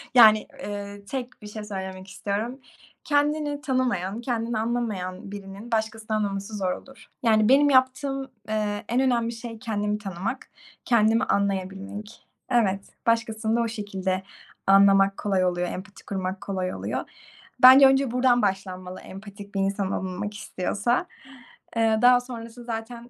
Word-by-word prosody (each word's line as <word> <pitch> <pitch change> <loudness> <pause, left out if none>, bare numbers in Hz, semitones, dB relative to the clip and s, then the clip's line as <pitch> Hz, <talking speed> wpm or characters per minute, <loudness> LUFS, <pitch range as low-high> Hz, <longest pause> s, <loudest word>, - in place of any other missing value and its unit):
Yani, 215 -3 +8 0.2
eee, 205 0 -6
tek 250 0 -6
bir 210 - -9
şey 210 0 -7
söylemek 190 -2 -6
istiyorum. 210 +7 -3 0.4
Kendini 290 0 +1
tanımayan, 240 -7 -1
kendini 235 -2 -2
anlamayan 205 -5 -3
birinin 200 +3 -9
başkasını 220 0 -1
anlaması 200 0 -3
zor 185 -2 0
olur. 270 +6 -9 0.2
Yani, 215 -1 +4
benim 285 +2 +6
yaptığım, 270 +1 +2 0.2
eee, 210 -1 -1
en 240 +3 +2
önemli 235 -3 +1
şey 230 -1 -8
kendimi 210 -3 -1
tanımak, 200 +5 -5 0.4
kendimi 225 0 +4
anlayabilmek. 200 +1 -3 0.2
Evet, 200 -5 +2 0.2
başkasını 225 -1 +1
da 235 - +2
o 230 - 0
şekilde 190 -3 -3 0.4
anlamak 195 0 +6
kolay 190 -3 +1
oluyor, 175 0 0
empati 200 +2 -9
kurmak 190 -1 -3
kolay 185 -2 -3
oluyor. - - -3 0.6
Bence 265 +2 +11
önce 270 -2 +3
buradan 250 0 +3
başlanmalı, 185 -2 -3
empatik 200 +1 -11
bir 195 - +1
insan 195 0 0
olunmak 190 +3 -3
istiyorsa. 205 +3 -1 0.7
Eee, 220 -1 +3
daha 245 0 +7
sonrası 240 -1 -9
zaten 235 +1 -6
215 Hz, 135 wpm, -25 LUFS, 195-240 Hz, 0.7 s, Bence